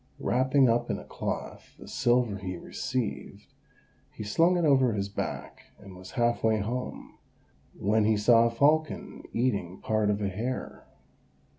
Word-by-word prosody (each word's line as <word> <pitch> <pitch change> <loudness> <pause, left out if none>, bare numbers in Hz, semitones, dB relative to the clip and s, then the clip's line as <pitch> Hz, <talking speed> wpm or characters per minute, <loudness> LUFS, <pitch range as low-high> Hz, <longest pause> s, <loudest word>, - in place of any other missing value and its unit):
Wrapping 130 +2 +3
up 120 +1 +1
in - - -1
a - - -9
cloth - - -6
the - - -12
silver 120 -5 +1
he 90 -2 -5
received, 130 +4 -5 0.6
he - - -7
slung 165 - +3
it 170 - +1
over 130 -5 +4
his 100 -1 -2
back, 100 - -5
and 100 -2 -13
was 90 0 -11
half 120 0 +1
way 110 -1 +3
home, 120 +5 -5 0.6
when 105 +2 +2
he 110 0 +3
saw 115 +2 +5
a - - 0
falcon 150 +6 +1
eating 100 -7 -1
part 110 -1 0
of 105 0 +1
a 100 - -1
hare. 120 +7 -5
115 Hz, 155 wpm, -28 LUFS, 105-130 Hz, 0.6 s, saw